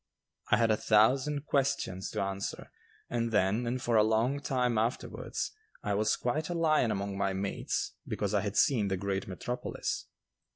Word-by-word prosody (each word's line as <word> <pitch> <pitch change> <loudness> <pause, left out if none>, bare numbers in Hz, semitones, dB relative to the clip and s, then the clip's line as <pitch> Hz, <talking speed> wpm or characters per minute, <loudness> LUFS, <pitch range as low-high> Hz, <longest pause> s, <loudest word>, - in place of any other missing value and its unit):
I - - +5
had 115 -1 +3
a 110 - +3
thousand 135 +8 +3
questions 135 -11 0
to - - -2
answer, 95 0 -4 0.4
and 115 -1 -1
then 105 +4 +2
and 125 +2 -1
for 120 -2 +1
a 105 - +6
long 115 +6 +2
time 125 -5 +1
afterwards 115 +3 -2 0.3
I 105 - 0
was 105 +2 +2
quite 150 +6 -1
a 175 - -2
lion 155 -7 +3
among 100 -1 -2
my 100 -1 +1
mates 95 +1 -2 0.2
because 105 0 -2
I 100 - +3
had 100 0 -3
seen 115 -7 +4
the 95 -1 0
great 95 0 -2
metropolis. 125 +6 -4
110 Hz, 170 wpm, -31 LUFS, 100-125 Hz, 0.4 s, a